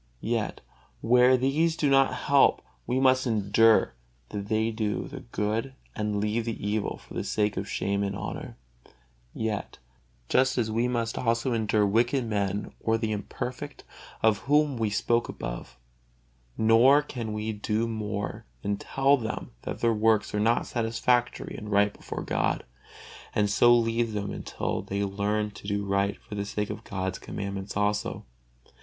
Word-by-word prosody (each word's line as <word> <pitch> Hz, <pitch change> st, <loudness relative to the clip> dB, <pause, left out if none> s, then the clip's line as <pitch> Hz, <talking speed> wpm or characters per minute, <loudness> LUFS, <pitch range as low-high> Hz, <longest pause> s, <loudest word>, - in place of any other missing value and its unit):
Yet 115 Hz, -3 st, -1 dB, 0.4 s
where 125 Hz, +2 st, +5 dB
these 155 Hz, +6 st, +1 dB
do 150 Hz, -, +1 dB
not 135 Hz, -1 st, +5 dB
help, 140 Hz, -1 st, +3 dB, 0.2 s
we 125 Hz, +2 st, +1 dB
must 130 Hz, 0 st, +4 dB
endure 110 Hz, -, +4 dB, 0.4 s
that 100 Hz, -1 st, -5 dB
they 110 Hz, +1 st, +1 dB
do 110 Hz, -2 st, -2 dB
the -, -, -8 dB
good 110 Hz, +6 st, -2 dB, 0.2 s
and 105 Hz, -1 st, -1 dB
leave 105 Hz, +2 st, 0 dB
the 115 Hz, -2 st, -3 dB
evil 105 Hz, 0 st, -1 dB
for -, -, -15 dB
the -, -, -2 dB
sake 105 Hz, -1 st, 0 dB
of 95 Hz, +1 st, -4 dB
shame 100 Hz, +2 st, -1 dB
and 100 Hz, -1 st, -1 dB
of -, -, -5 dB
honor, -, -, -6 dB, 1.7 s
just 130 Hz, -, +3 dB
as 110 Hz, -3 st, 0 dB
we 115 Hz, +3 st, +1 dB
must 115 Hz, -2 st, -1 dB
also 115 Hz, +1 st, +1 dB
endure 110 Hz, -2 st, +2 dB
wicked 120 Hz, +5 st, +2 dB
men 100 Hz, -2 st, -2 dB
or 115 Hz, 0 st, +1 dB
the 110 Hz, -1 st, -2 dB
imperfect, 125 Hz, +6 st, -5 dB, 0.4 s
of 110 Hz, -2 st, +4 dB
whom 150 Hz, -1 st, +4 dB
we 110 Hz, -2 st, 0 dB
spoke 115 Hz, +3 st, +1 dB
above; -, -, -6 dB, 0.8 s
nor 120 Hz, +6 st, +6 dB
can 120 Hz, -6 st, -5 dB
we 105 Hz, +1 st, -2 dB
do 105 Hz, +2 st, -1 dB
more 105 Hz, -2 st, -4 dB, 0.2 s
than 100 Hz, 0 st, 0 dB
tell 135 Hz, +6 st, +2 dB
them 110 Hz, -4 st, -5 dB
that -, -, -6 dB
their 115 Hz, -1 st, +3 dB
works 110 Hz, -1 st, +2 dB
are 105 Hz, -, 0 dB
not 115 Hz, +3 st, +2 dB
satisfactory 120 Hz, +1 st, 0 dB
and 105 Hz, -, -7 dB
right 100 Hz, 0 st, +3 dB
before -, -, -6 dB
God, -, -, 0 dB, 0.7 s
and 105 Hz, -1 st, +2 dB
so 120 Hz, +3 st, +5 dB
leave 115 Hz, -1 st, 0 dB
them 105 Hz, -1 st, -3 dB
until -, -, -3 dB
they 100 Hz, +1 st, -2 dB
learn 105 Hz, +2 st, -1 dB
to 100 Hz, 0 st, -11 dB
do 100 Hz, 0 st, -1 dB
right 100 Hz, 0 st, 0 dB
for -, -, -12 dB
the 100 Hz, -1 st, -2 dB
sake 105 Hz, 0 st, -3 dB
of -, -, -7 dB
God's 95 Hz, -1 st, -3 dB
commandments 100 Hz, 0 st, -5 dB
also. 105 Hz, 0 st, -1 dB
110 Hz, 160 wpm, -27 LUFS, 105-120 Hz, 1.7 s, nor